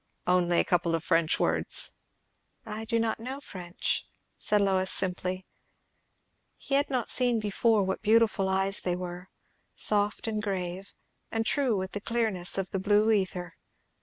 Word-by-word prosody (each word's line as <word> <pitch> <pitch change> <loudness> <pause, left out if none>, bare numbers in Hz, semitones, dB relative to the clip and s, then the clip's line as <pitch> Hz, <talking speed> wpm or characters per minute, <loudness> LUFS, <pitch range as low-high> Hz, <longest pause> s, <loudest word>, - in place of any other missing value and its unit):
"Only 175 -1 +3
a - - +4
couple 170 -2 +1
of 165 - -3
French 165 -2 +2
words." - - +1 0.7
"I 220 0 -5
do 230 +1 0
not 225 -1 0
know 260 +4 -5
French," 180 -9 -3 0.3
said 210 - +2
Lois 190 -2 +2
simply. 185 0 -2 1.1
He 275 - -6
had 280 +1 +3
not 255 -4 0
seen 245 -3 +3
before 215 +1 +2
what 190 0 -2
beautiful 215 -3 +3
eyes 195 +1 +1
they 180 -1 0
were; 180 0 -7 0.5
soft 205 -1 0
and 215 -2 -1
grave, 190 -1 -4 0.4
and 225 0 -1
true 255 -4 +1
with 190 0 -3
the 205 - -4
clearness 215 -7 -1
of 195 -1 -2
the 195 - -1
blue 210 +3 +3
ether. 185 -4 -1
195 Hz, 155 wpm, -28 LUFS, 180-220 Hz, 1.1 s, a